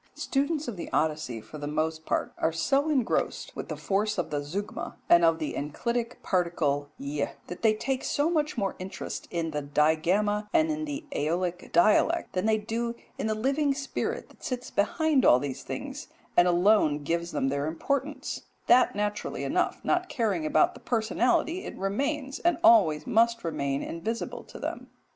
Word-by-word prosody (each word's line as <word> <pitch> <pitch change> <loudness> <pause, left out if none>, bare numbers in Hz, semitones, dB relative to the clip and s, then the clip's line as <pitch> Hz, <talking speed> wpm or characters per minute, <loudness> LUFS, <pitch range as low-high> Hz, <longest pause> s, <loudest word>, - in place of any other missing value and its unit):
Students 290 +2 -1
of 230 -6 -4
the 170 - -6
Odyssey 150 -7 0
for 150 +8 -10
the 145 - -4
most 155 +1 -2
part - - -1
are 160 - +2
so 275 - +1
engrossed 265 -6 0
with - - -5
the - - -4
force 205 +2 0
of 170 -3 -2
the 145 - 0
zeugma, 185 +8 -5
and 170 0 +6
of 165 -1 +5
the 155 -2 -3
enclitic 235 - -3
particle 155 -6 0
[Greek]; 140 +1 -2 0.2
they 215 +5 +1
take 260 +4 -2
so 290 +2 +1
much 305 -5 0
more 195 -3 -1
interest 185 +1 -6
in 165 -2 -2
the 150 -1 -2
digamma 170 +9 +2
and 320 -1 +4
in 310 0 -2
the 295 +1 -5
AEolic 175 +4 -1
dialect, 215 - +3
than 185 +4 0
they 220 0 +4
do 230 +2 -3 0.2
in - - -1
the 215 - 0
living 275 +5 +1
spirit 275 0 -3
that - - -20
sits 250 -1 -4
behind 295 +7 +2
all 125 - +7
these 135 0 -4
things 285 - -6 0.3
and 175 - +6
alone 175 -5 +3
gives 170 +3 -1
them 135 - 0
their 140 +2 -1
importance, 280 - -2 0.2
that, 250 -3 +5
naturally 210 0 -2
enough, - - 0
not 360 0 +1
caring 195 -10 0
about 155 - +3
the - - -12
personality, 245 - +1
it - - -7
remains 270 +8 -2
and 345 -1 +2
always 160 - +6
must 230 +1 +3
remain 140 -4 -1
invisible 220 +8 -4
to - - -12
them. - - -5
205 Hz, 175 wpm, -28 LUFS, 160-260 Hz, 0.3 s, all